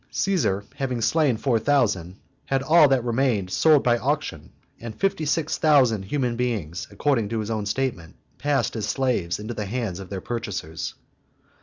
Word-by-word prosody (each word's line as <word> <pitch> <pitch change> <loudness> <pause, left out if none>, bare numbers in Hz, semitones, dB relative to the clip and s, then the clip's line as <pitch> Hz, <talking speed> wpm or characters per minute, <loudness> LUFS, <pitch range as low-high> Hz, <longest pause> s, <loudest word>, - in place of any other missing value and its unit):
Caesar, 165 - 0
having 130 -3 -2
slain 140 0 +2
four 120 0 +1
thousand, 105 -10 +1 0.3
had 135 0 0
all 155 +1 +6
that 135 -3 +2
remained 120 -6 0
sold 155 +3 +4
by 120 -1 +3
auction; - - -2 0.3
and 115 -2 -8
fifty 195 -5 0
six 155 +1 0
thousand 135 - +4
human 120 +4 -1
beings, 110 -9 -3
according 115 0 0
to 115 - -2
his 110 +1 -3
own 105 -2 -2
statement, 105 -8 -3 0.2
passed 145 -3 0
as 105 -2 -2
slaves 120 -10 0
into 110 +3 -6
the 105 -2 -4
hands 110 -5 -3
of 95 -2 -9
their 95 - -4
purchasers. 100 -8 -5
120 Hz, 165 wpm, -24 LUFS, 105-135 Hz, 0.3 s, all